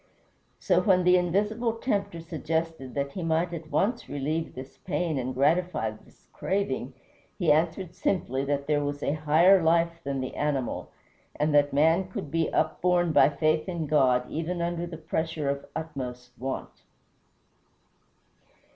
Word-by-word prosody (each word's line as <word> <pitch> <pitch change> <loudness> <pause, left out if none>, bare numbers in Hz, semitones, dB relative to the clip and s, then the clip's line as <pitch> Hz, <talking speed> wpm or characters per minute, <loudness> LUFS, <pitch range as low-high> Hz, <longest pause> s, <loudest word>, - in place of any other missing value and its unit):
So - - +3
when 185 -3 +3
the 180 +1 +5
invisible 210 +6 +1
tempter 200 -7 -2
suggested 160 -4 -3
that 140 0 -1
he 185 - -5
might 165 +1 0
at 160 -2 -7
once 230 +8 0
relieve 155 +3 -2
this 130 +1 -10
pain 170 -5 -1
and 130 0 -2
gratify 150 -4 +1
this 110 - -18
craving, 200 +1 -2 0.4
he 175 -6 +3
answered 170 +3 +1
simply 135 -8 -1
that 140 0 -1
there 145 -1 +1
was 145 0 -3
a - - +1
higher 160 +5 +5
life 170 +1 +2
than 140 -1 -2
the 130 -1 -4
animal, 140 -4 -2 0.5
and 150 0 0
that 145 0 +4
man 160 +6 +3
could 150 -6 -6
be 165 -1 0
upborne 175 +2 +1
by 135 - +6
faith 155 +4 0
in 170 -3 -2
God 130 -4 +3
even 165 +3 -3
under 170 0 -2
the 165 -2 -7
pressure 160 -1 -2
of 140 0 -2
utmost 125 -6 -6
want. 135 +1 -5
160 Hz, 150 wpm, -27 LUFS, 145-175 Hz, 0.5 s, by